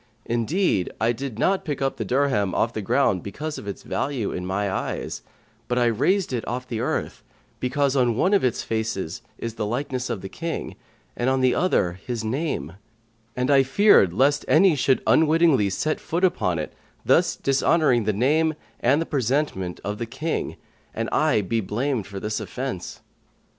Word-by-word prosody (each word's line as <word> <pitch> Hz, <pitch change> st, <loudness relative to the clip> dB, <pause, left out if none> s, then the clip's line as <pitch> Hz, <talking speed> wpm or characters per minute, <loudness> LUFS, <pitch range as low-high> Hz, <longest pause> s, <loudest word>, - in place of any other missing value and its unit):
Indeed, 120 Hz, -, 0 dB
I 115 Hz, +1 st, +2 dB
did 125 Hz, -1 st, -5 dB
not 190 Hz, +9 st, +1 dB
pick 145 Hz, -4 st, -3 dB
up 135 Hz, 0 st, -1 dB
the -, -, -2 dB
dirham 125 Hz, -5 st, +1 dB
off 115 Hz, +1 st, +1 dB
the 110 Hz, -, -3 dB
ground 100 Hz, -3 st, +2 dB
because 150 Hz, -, -5 dB
of 105 Hz, -, -10 dB
its 100 Hz, -, -6 dB
value 130 Hz, -7 st, -2 dB
in 90 Hz, 0 st, -4 dB
my 100 Hz, +2 st, -1 dB
eyes; 95 Hz, -, -3 dB, 0.5 s
but 120 Hz, -, -1 dB
I 120 Hz, -, +3 dB
raised 140 Hz, -, +1 dB
it 120 Hz, -3 st, -1 dB
off 125 Hz, +1 st, -4 dB
the 115 Hz, -3 st, -3 dB
earth -, -, -2 dB, 0.4 s
because 140 Hz, +2 st, 0 dB
on 125 Hz, -4 st, +2 dB
one 190 Hz, +8 st, +2 dB
of 200 Hz, -, +4 dB
its 125 Hz, -3 st, 0 dB
faces 110 Hz, -7 st, -3 dB, 0.2 s
is 115 Hz, -1 st, -5 dB
the 110 Hz, -, -3 dB
likeness 125 Hz, +1 st, -2 dB
of 115 Hz, -6 st, -3 dB
the 95 Hz, -, -6 dB
King 165 Hz, -, -5 dB, 0.4 s
and 120 Hz, +2 st, 0 dB
on 130 Hz, 0 st, +1 dB
the 130 Hz, -1 st, +4 dB
other 95 Hz, -, +1 dB
his 120 Hz, -3 st, -3 dB
name; 110 Hz, -, -2 dB, 0.6 s
and 125 Hz, +2 st, 0 dB
I 135 Hz, -1 st, +6 dB
feared 135 Hz, -, +5 dB
lest 140 Hz, +9 st, +2 dB
any 180 Hz, +2 st, +5 dB
should 135 Hz, -2 st, +1 dB
unwittingly 155 Hz, -8 st, +4 dB
set 155 Hz, +10 st, -1 dB
foot 170 Hz, +3 st, -3 dB
upon 90 Hz, -, +2 dB
it, 75 Hz, -, -4 dB, 0.3 s
thus -, -, +3 dB
dishonouring 135 Hz, -3 st, +2 dB
the 105 Hz, -, +2 dB
name 150 Hz, +9 st, +2 dB, 0.2 s
and 145 Hz, +7 st, +2 dB
presentment 130 Hz, -, -1 dB
of 105 Hz, +1 st, -4 dB
the 115 Hz, -, -3 dB
King, 150 Hz, +7 st, -3 dB, 0.4 s
and -, -, -2 dB
I -, -, +3 dB
be 115 Hz, +4 st, -1 dB
blamed 115 Hz, +3 st, -2 dB
for 100 Hz, -1 st, -6 dB
this 105 Hz, +2 st, -2 dB
offence." 125 Hz, -9 st, -5 dB
125 Hz, 180 wpm, -24 LUFS, 105-145 Hz, 0.6 s, I